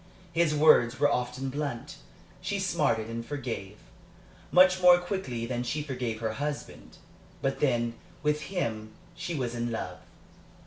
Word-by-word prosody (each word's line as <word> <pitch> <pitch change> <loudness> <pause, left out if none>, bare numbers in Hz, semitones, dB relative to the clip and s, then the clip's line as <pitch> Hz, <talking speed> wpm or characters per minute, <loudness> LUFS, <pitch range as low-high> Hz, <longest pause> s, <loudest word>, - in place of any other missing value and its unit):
His 165 -2 +2
words 140 -5 +5
were 145 0 +4
often 125 +1 -1
blunt. 140 -4 -4 0.4
She - - -2
smarted 110 -1 +1
and 115 0 -4
forgave 115 -7 -5 0.7
much 185 +1 +6
more 180 0 +8
quickly 175 - -3
than 120 0 -2
she 145 +5 -2
forgave 125 -6 -3
her 110 -1 -1
husband. 145 +4 -5 0.5
But 135 0 0
then, 120 -4 +1 0.3
with 150 0 +1
him, 110 - -3 0.2
she 175 0 -4
was 125 -4 -2
in 120 0 -2
love. 115 - -4
130 Hz, 140 wpm, -29 LUFS, 115-150 Hz, 0.7 s, more